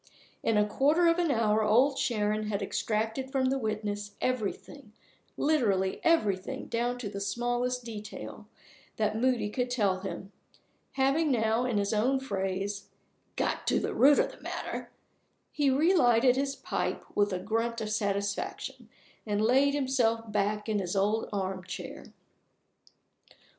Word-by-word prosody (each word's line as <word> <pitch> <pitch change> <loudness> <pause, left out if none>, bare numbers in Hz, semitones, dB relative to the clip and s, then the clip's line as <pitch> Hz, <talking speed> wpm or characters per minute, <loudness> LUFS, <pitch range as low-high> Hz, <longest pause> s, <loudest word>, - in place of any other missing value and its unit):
In 225 - +1
a 210 - +4
quarter 290 +10 +2
of 335 +1 +4
an 345 -2 +1
hour 220 -4 +2
Old 245 +7 +4
Sharon 215 -3 0
had 205 -1 -2
extracted 225 +6 -2
from 260 -1 +1
the 270 - 0
witness 210 -2 -3
everything, 255 0 -3 0.4
literally 205 -11 +1
everything 205 - +1
down 240 +1 -1
to 245 -4 -5
the 200 0 -5
smallest 245 +4 -1
detail, 215 -2 -8 0.5
that 215 -1 0
Moody 245 -1 +1
could 250 +2 -1
tell 205 -7 +1
him. 195 0 -6 0.6
Having 275 +4 +2
now, 225 -1 +2
in 240 -4 0
his 200 +1 0
own 250 +6 +2
phrase, 195 -4 -3 0.5
"got - - -1
to - - +3
the - - -2
root 285 +2 +6
of - - +2
the - - -16
matter," - - -5 0.6
he 290 -2 +2
relighted 260 -5 +4
his 275 +1 -1
pipe - - -3
with 205 0 +2
a 185 - -1
grunt 225 +5 -1
of 215 -1 -3
satisfaction, 200 -1 -2 0.4
and 205 -1 0
laid 265 +6 +3
himself 235 -5 0
back 210 +1 0
in 215 -2 0
his 180 0 -3
old 210 +3 +1
armchair. 190 -2 -5
220 Hz, 140 wpm, -29 LUFS, 205-260 Hz, 0.6 s, root